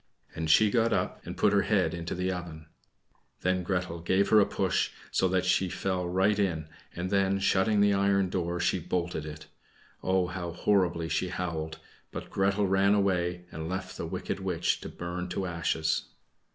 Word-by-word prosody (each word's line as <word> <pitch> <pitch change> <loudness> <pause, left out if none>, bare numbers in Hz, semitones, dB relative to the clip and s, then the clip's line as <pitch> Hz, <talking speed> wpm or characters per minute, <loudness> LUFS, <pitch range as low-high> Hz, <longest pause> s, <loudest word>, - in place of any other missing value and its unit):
And 80 -1 -3
she 105 +6 +6
got 115 0 +2
up, - - -1
and - - -6
put - - +3
her - - +4
head - - +1
into 85 -1 -4
the 90 +1 -1
oven. 85 -3 -6 0.8
Then 90 0 +1
Gretel 90 -2 -2
gave 95 +4 +1
her 110 - +7
a 100 - +4
push, - - 0 0.2
so 95 - +2
that 95 0 +1
she 90 +1 +2
fell 90 -1 -2
right 95 +3 +2
in, 80 -6 0 0.3
and 90 +2 -3
then, 100 -1 +2
shutting 100 +2 +2
the 100 0 +4
iron 100 -1 +2
door, 90 -1 -1
she - - +1
bolted 85 -4 -2
it. 75 +1 -8 0.6
Oh! 95 -1 +2
how 90 -1 -5
horribly 85 -3 +1
she 90 - 0
howled; 80 -3 -3 0.3
but - - -7
Gretel 100 +1 +2
ran 95 +1 +3
away, 90 -3 0
and 80 +1 -5
left 95 +1 -4
the - - -4
wicked - - -4
witch - - 0
to - - -6
burn 90 +1 -5
to 95 +1 -2
ashes. 80 -2 0
90 Hz, 180 wpm, -29 LUFS, 85-95 Hz, 0.8 s, her